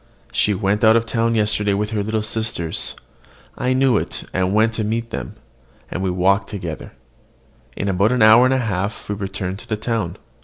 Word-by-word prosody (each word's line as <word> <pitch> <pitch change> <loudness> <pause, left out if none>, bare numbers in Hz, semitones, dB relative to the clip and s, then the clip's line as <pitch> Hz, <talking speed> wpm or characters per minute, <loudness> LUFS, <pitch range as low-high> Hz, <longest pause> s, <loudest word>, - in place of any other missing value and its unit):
She 105 - +2
went 100 +3 0
out 115 +1 +5 0.3
yesterday 105 -2 +2
with 105 +2 -2
her 105 -2 -1
little 110 +1 -1
sisters: 110 -7 -2 0.6
I 125 +1 0
knew 130 -3 +3
it, - - -4
and 95 0 +1
went 110 +2 +3
to 115 - -2
meet 115 +2 -2
them; 65 -3 -5 0.6
and 95 - -3
we 95 - 0
walked 95 +3 +1
together. 85 -6 -6 0.8
In 100 - -2
about 100 +3 +2
an 125 -3 +3
hour 110 +3 +8
and 130 - +3
a - - +2
half 105 -3 -3
we 105 - -2
returned 95 -1 -4
to 120 - -14
the 110 - -1
town. 110 -6 -2
105 Hz, 185 wpm, -20 LUFS, 95-115 Hz, 0.8 s, hour